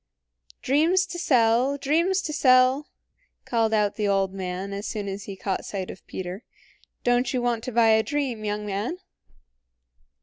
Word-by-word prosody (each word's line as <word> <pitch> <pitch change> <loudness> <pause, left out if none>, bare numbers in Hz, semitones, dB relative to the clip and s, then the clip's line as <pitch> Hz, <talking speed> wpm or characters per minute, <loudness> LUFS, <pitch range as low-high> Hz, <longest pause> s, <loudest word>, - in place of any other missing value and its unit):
"Dreams 330 +8 +3
to 350 -1 -7
sell! 250 -1 +3
Dreams 335 +7 +1
to 305 - -3
sell!" 255 +1 +4 0.6
called 225 -2 +1
out 210 -2 +1
the 210 -2 0
old 195 -1 +1
man 190 +1 -4
as 200 +1 -5
soon 210 -2 -4
as 195 +1 -5
he 200 - -7
caught 190 0 -3
sight 190 -2 -5
of - - -14
Peter. 185 +4 -6 0.6
"Don't 245 0 +2
you 255 - 0
want 240 -2 -1
to 255 - -4
buy 230 -1 +4
a 220 0 +5
dream, 260 -4 -2
young 210 0 -3
man?" 210 - -3
230 Hz, 165 wpm, -25 LUFS, 200-270 Hz, 0.6 s, a